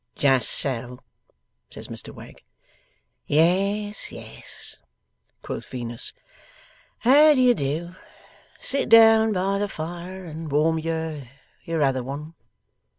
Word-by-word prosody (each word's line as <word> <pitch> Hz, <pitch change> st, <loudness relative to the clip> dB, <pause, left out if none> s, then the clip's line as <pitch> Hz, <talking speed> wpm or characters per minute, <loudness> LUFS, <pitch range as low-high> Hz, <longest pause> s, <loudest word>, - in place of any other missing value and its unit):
'Just 130 Hz, -5 st, +3 dB
so,' 125 Hz, -2 st, -1 dB, 0.7 s
says -, -, -7 dB
Mr -, -, -5 dB
Wegg. -, -, -13 dB, 0.9 s
'Yes, 195 Hz, +7 st, +1 dB
yes,' -, -, -9 dB, 0.6 s
quoth -, -, -6 dB
Venus. 120 Hz, -2 st, -4 dB, 0.9 s
'How 295 Hz, +5 st, +6 dB
do 260 Hz, -, +3 dB
you 250 Hz, -1 st, +6 dB
do? 160 Hz, +1 st, -3 dB, 0.7 s
Sit 275 Hz, -, -2 dB
down 225 Hz, -1 st, +7 dB
by 195 Hz, 0 st, 0 dB
the 205 Hz, -, 0 dB
fire, 175 Hz, +3 st, -7 dB
and 160 Hz, -1 st, -7 dB
warm 160 Hz, +3 st, +2 dB
your 160 Hz, -4 st, -4 dB, 0.4 s
your 165 Hz, -2 st, 0 dB
other 135 Hz, -2 st, +1 dB
one. 145 Hz, +5 st, -7 dB
165 Hz, 110 wpm, -24 LUFS, 140-200 Hz, 0.9 s, down